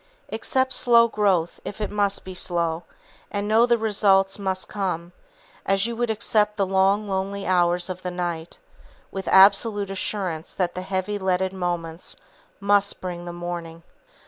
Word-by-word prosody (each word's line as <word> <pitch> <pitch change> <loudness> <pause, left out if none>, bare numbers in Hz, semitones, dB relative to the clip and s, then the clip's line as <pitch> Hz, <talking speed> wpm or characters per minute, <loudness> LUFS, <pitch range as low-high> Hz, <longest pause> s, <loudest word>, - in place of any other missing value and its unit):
Accept 260 +4 0
slow 235 -1 +5
growth 195 -6 0
if 205 - -7
it 210 - -3
must 205 -1 0
be 185 - -7
slow, 170 -2 -1 0.4
and 205 0 -3
know 225 +3 +4
the 240 -1 +3
results 195 -3 +2
must 190 -1 -2
come, 180 -4 -3 0.5
as 195 +1 +1
you 235 0 -3
would 240 0 -1
accept 210 -1 +1
the 200 - +2
long, 195 +2 +2
lonely 195 +1 -3
hours 175 -1 +2
of 185 -1 -6
the 180 - -3
night, 175 -2 -4 0.5
with 195 0 -6
absolute 200 +1 +5
assurance 185 -4 -3
that 180 -2 0
the 185 - -4
heavy 190 +2 -2
leaded 190 0 0
moments 175 -2 -3 0.4
must 200 0 +2
bring 175 -1 -6
the 175 - -5
morning. 170 -1 -6
190 Hz, 155 wpm, -24 LUFS, 175-205 Hz, 0.5 s, slow